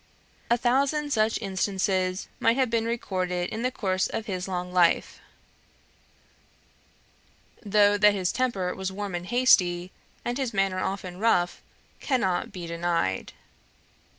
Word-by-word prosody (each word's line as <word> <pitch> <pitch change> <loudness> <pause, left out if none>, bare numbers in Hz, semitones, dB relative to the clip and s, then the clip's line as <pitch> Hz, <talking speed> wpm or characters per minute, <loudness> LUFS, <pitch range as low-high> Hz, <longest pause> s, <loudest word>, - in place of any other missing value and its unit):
A 235 - +4
thousand 280 +4 +1
such 220 0 +2
instances 190 -1 -1
might 230 +2 +3
have 260 -3 +1
been 230 -1 +1
recorded 185 -6 -2
in 220 - -4
the 250 - +1
course 190 -6 -1
of 225 - -4
his 185 -2 -4
long 180 -1 -4
life; 175 -2 +2 2.4
though 205 0 +4
that 210 0 +5
his 185 -2 0
temper 205 -8 -1
was 190 0 -4
warm 200 0 -5
and 175 0 -4
hasty, 185 -8 +3 0.3
and 245 +2 -2
his 250 -5 -2
manner 195 -1 +1
often 185 -1 -4
rough, 180 -5 +1 0.4
cannot 215 -10 0
be 180 -2 -7
denied. 170 - -1
195 Hz, 130 wpm, -26 LUFS, 180-230 Hz, 2.4 s, that